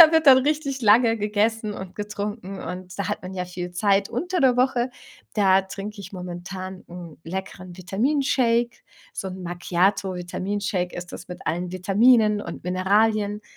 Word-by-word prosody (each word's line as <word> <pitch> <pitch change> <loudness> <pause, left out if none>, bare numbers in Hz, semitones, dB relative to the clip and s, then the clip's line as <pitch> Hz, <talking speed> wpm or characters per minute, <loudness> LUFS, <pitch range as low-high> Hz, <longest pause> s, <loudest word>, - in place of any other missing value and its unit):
Da 320 -2 +11
wird 320 -1 +3
dann 265 -2 +10
richtig 280 -1 -1
lange 225 +1 +5
gegessen 210 +1 0
und 190 -1 -8
getrunken 205 -1 -5
und 180 +1 -7
da 200 - -1
hat - - -3
man 185 +1 -7
ja 180 - -2
viel 180 0 -6
Zeit 195 +2 +2
unter 350 +10 -2
der 255 -2 +4
Woche, 255 -1 +2 0.4
da 195 -3 +5
trink 200 +2 -7
ich 200 - -8
momentan 185 +1 -7
'n 175 -2 -10
leckeren 185 +1 -6
Vitaminshake 235 - +1 0.3
so 190 - -4
'n 185 0 -7
Macchiato 180 +2 0
Vitaminshake 180 +1 -3
ist 180 0 -7
das - - -9
mit 180 - -9
allen 175 +2 -1
Vitaminen 210 +3 +4
und 170 -1 -8
Mineralien. 205 +3 +2
200 Hz, 160 wpm, -24 LUFS, 180-225 Hz, 0.4 s, Da